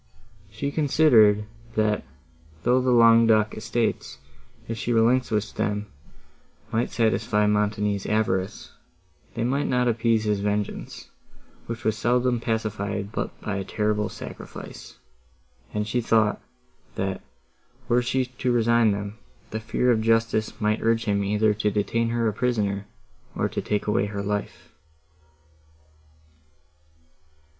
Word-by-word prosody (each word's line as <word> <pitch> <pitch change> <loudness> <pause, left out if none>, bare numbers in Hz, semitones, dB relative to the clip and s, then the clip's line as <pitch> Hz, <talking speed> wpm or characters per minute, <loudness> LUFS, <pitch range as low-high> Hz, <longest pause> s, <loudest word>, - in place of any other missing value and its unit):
She 115 +8 -4
considered, 125 -9 +4 0.3
that, 110 -1 +1 0.6
though 125 +4 +3
the 130 - 0
Languedoc 115 -2 +5
estates, 115 +1 -2 0.5
if 115 - -3
she 115 +2 -3
relinquished 115 -2 +1
them, 105 0 -2 0.8
would 115 +2 0
satisfy 110 -2 +1
Montoni's 105 -1 0
avarice, 105 -2 -1 0.6
they 115 - -1
might 135 +4 0
not 125 0 +1
appease 115 -1 +2
his 105 -2 0
vengeance, 105 0 -3 0.6
which 115 -1 -5
was 110 -1 0
seldom 125 +1 +2
pacified 105 -3 -2
but - - -4
by 105 -2 -3
a 95 - -2
terrible 105 +1 -1
sacrifice; - - -10 0.7
and 105 0 -2
she 120 +3 0
even 115 - -6
thought, 110 -2 +3 0.5
that, 95 -1 -2 0.7
were 125 0 +3
she 130 +1 0
to 125 0 -2
resign 115 -2 +3
them, 100 +1 -6 0.3
the 110 - -3
fear 120 +3 +1
of 110 -2 +2
justice 115 -1 +1
might 105 +1 +1
urge 115 0 +1
him 100 -1 +1
either 105 +2 +2
to 105 0 0
detain 115 +3 0
her 115 -1 0
a 110 - 0
prisoner, 105 -4 -1 0.5
or - - 0
to - - -3
take 105 -1 -1
away 105 -1 +1
her 100 -1 -4
life. 105 0 -4
110 Hz, 130 wpm, -25 LUFS, 105-115 Hz, 0.8 s, Languedoc